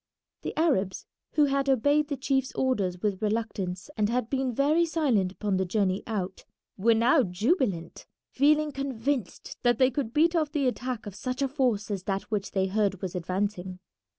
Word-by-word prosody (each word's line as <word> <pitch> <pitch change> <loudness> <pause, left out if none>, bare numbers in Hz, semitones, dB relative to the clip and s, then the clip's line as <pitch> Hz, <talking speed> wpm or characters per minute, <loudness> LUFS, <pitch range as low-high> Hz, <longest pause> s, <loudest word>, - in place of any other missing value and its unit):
The - - -5
Arabs, 235 - +1 0.3
who 300 - +4
had 275 0 0
obeyed 285 +4 +3
the 285 -2 -3
chief's 265 0 0
orders 200 -9 0
with 200 -3 0
reluctance 210 -4 -2
and 210 -1 +1
had 240 -1 -1
been 265 -2 0
very 290 +7 +3
silent 280 - +1
upon 200 -1 -1
the 190 - +1
journey 190 0 0
out, 195 -4 -3 0.3
were 225 +4 +3
now 245 +6 +4
jubilant, 205 - -1 0.2
feeling 300 +2 +3
convinced 270 -4 -3
that 240 -2 +3
they 260 +1 +4
could 255 -4 -2
beat 330 +6 +3
off 310 -2 0
the 285 -4 +1
attack 250 -2 -3
of 205 - -7
such 255 +6 -3
a - - +2
force 245 -6 0
as 195 -2 -3
that 195 +1 -3
which 205 -2 -1
they 190 -2 +2
heard 195 -1 0
was 185 - -3
advancing. 185 +1 -3
230 Hz, 180 wpm, -27 LUFS, 195-275 Hz, 0.3 s, who